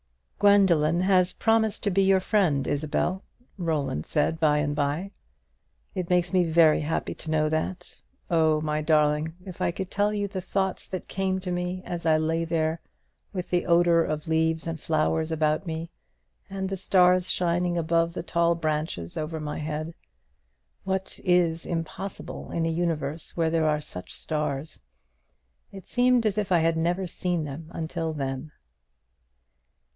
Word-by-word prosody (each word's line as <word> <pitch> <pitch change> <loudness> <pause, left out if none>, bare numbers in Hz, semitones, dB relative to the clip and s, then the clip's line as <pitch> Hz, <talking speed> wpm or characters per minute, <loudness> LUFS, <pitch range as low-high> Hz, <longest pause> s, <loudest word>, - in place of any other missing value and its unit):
"Gwendoline 180 -5 +4
has 185 -1 +3
promised 225 -1 +1
to 205 - +1
be 195 +2 +3
your 195 0 +4
friend, 180 -9 +1
Isabel," 155 +6 -1 0.4
Roland 150 - -1
said 160 +2 0
by 150 -2 +3
and 145 0 0
by; 150 +7 -1 0.8
"it 180 -3 -3
makes 180 -1 +2
me 185 -1 +4
very 165 -2 +5
happy 155 +1 -2
to 160 - -7
know 155 -1 +2
that. 175 +3 -3 0.3
Oh, 160 -2 +3
my 155 0 -1
darling, 150 +1 +2
if 185 -2 -9
I - - +2
could 185 +2 -5
tell 205 +1 +1
you 205 -1 -1
the 190 -2 -5
thoughts 190 0 -2
that 185 - -6
came 190 0 -1
to 180 -1 -4
me 180 +1 -3
as 170 -1 -4
I 155 -1 +5
lay 160 +1 0
there, 160 -1 -1 0.5
with 180 -3 -5
the 175 -1 +1
odour 170 -1 +4
of 155 0 -3
leaves 160 0 +1
and 165 -1 -4
flowers 160 +1 0
about 155 +2 0
me, 165 +1 -4 0.6
and 195 -1 -3
the 195 - -2
stars 180 -1 +3
shining 175 0 +1
above 165 +1 +1
the - - -3
tall 170 0 +2
branches 155 - -2
over 155 +1 -3
my 150 -1 -4
head. 155 +1 -4 0.9
What 190 0 -3
is 170 -2 +2
impossible 170 +4 -5
in 165 -1 -1
a 165 - 0
universe 160 -2 -2
where 165 -1 +2
there 160 -1 +2
are 150 0 +1
such 90 -11 -7
stars? 150 -1 -3 0.9
It 195 -2 -11
seemed 250 -1 +3
as 215 -1 +1
if 205 -2 -3
I 175 -2 +4
had 165 0 +2
never 175 +3 0
seen 175 -1 -2
them 150 +2 -7
until 165 0 -3
then." 135 0 -4
165 Hz, 160 wpm, -26 LUFS, 155-185 Hz, 0.9 s, very